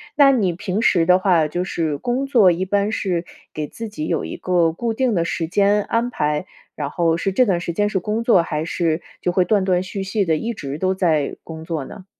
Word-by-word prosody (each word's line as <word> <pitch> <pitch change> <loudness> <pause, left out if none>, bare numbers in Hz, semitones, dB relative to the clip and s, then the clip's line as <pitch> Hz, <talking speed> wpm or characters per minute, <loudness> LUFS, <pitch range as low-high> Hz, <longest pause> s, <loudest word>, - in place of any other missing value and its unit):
那 280 -1 +6
你 200 -9 +1
平 200 +3 -3
时 170 -7 +3
的 180 0 +6
话， 175 -5 +3
就 175 +4 -2
是 160 -5 -2
工 250 - -2
作 220 -9 +5
一 180 +2 -1
般 200 +2 0
是 180 -6 -1 0.3
给 155 -1 -3
自 225 +8 -7
己 155 -7 -5
有 - - -1
一 - - -6
个 175 -3 +2
固 230 +6 -2
定 245 -3 0
的 170 - +1
时 165 0 -2
间 200 +3 +2
安 235 +2 -1
排， 150 -3 -1 0.3
然 145 -2 -3
后 165 -1 +1
是 195 +3 -1
这 255 +7 +3
段 180 -4 +1
时 170 - -3
间 205 +4 +1
是 205 - -1
工 215 +5 -2
作， 190 -8 +4
还 155 -1 -3
是 165 -1 -1 0.2
就 180 - 0
会 180 0 +3
断 200 +1 +2
断 180 -1 +2
续 195 +1 -5
续 200 +2 0
地 160 -2 +2
一 230 +6 -3
直 140 -6 -6
都 185 +2 0
在 160 -6 0
工 160 0 -9
作 160 -5 -3
呢？ 185 +7 -11
185 Hz, 255 characters per minute, -21 LUFS, 165-210 Hz, 0.3 s, 那